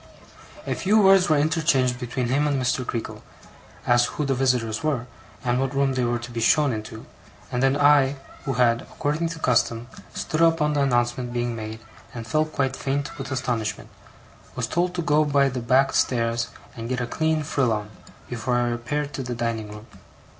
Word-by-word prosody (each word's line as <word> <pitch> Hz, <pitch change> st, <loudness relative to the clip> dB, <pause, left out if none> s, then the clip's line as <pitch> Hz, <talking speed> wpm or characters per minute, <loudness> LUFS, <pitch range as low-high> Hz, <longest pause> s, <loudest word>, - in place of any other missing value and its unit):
A -, -, -1 dB
few 205 Hz, +3 st, +2 dB
words 195 Hz, -3 st, +6 dB
were 155 Hz, -, +4 dB
interchanged 145 Hz, -5 st, +2 dB
between 125 Hz, 0 st, -3 dB
him 145 Hz, +3 st, +2 dB
and 140 Hz, -2 st, 0 dB
Mr. 125 Hz, 0 st, 0 dB
Creakle, 115 Hz, -2 st, -5 dB, 0.6 s
as, 120 Hz, 0 st, +4 dB
who 150 Hz, -, -3 dB
the 135 Hz, -, +1 dB
visitors 125 Hz, -4 st, 0 dB
were, 140 Hz, -6 st, 0 dB, 0.4 s
and 120 Hz, 0 st, +1 dB
what 135 Hz, 0 st, -2 dB
room 135 Hz, -1 st, +2 dB
they 130 Hz, -1 st, 0 dB
were 120 Hz, 0 st, +1 dB
to 120 Hz, +1 st, -8 dB
be 120 Hz, -, -4 dB
shown 145 Hz, +4 st, +3 dB
into; 110 Hz, 0 st, -7 dB, 0.5 s
and 125 Hz, -, -1 dB
then 135 Hz, +1 st, +3 dB
I, 145 Hz, -1 st, +5 dB, 0.3 s
who 135 Hz, -, -1 dB
had, 120 Hz, -1 st, +3 dB
according 155 Hz, +3 st, -2 dB
to 165 Hz, -, -6 dB
custom, 120 Hz, -4 st, +1 dB, 0.3 s
stood 155 Hz, -, -2 dB
up 165 Hz, 0 st, +4 dB
on 150 Hz, -1 st, +1 dB
the 145 Hz, -, +1 dB
announcement 120 Hz, -2 st, 0 dB
being 120 Hz, -1 st, -1 dB
made, 110 Hz, 0 st, -6 dB, 0.3 s
and 115 Hz, -1 st, -6 dB
felt 155 Hz, +5 st, 0 dB
quite 135 Hz, -2 st, -1 dB
faint 140 Hz, +2 st, -3 dB
with 135 Hz, +1 st, -6 dB
astonishment, 120 Hz, -4 st, -2 dB, 0.7 s
was 125 Hz, -, -1 dB
told 175 Hz, +7 st, -1 dB
to 175 Hz, -, -1 dB
go 150 Hz, 0 st, +3 dB
by 140 Hz, -2 st, +3 dB
the 125 Hz, -1 st, -4 dB
back 130 Hz, +4 st, +3 dB
stairs 115 Hz, -1 st, +1 dB, 0.3 s
and 115 Hz, 0 st, -6 dB
get 130 Hz, -1 st, -1 dB
a 125 Hz, -, -1 dB
clean 160 Hz, +4 st, 0 dB
frill 140 Hz, -5 st, +1 dB
on, 105 Hz, -1 st, -3 dB, 0.4 s
before 125 Hz, 0 st, -2 dB
I 120 Hz, 0 st, +1 dB
repaired 145 Hz, +5 st, -3 dB
to 135 Hz, -, -4 dB
the 125 Hz, -1 st, -4 dB
dining 115 Hz, -2 st, -2 dB
room. 105 Hz, +1 st, -10 dB
130 Hz, 195 wpm, -24 LUFS, 120-145 Hz, 0.7 s, words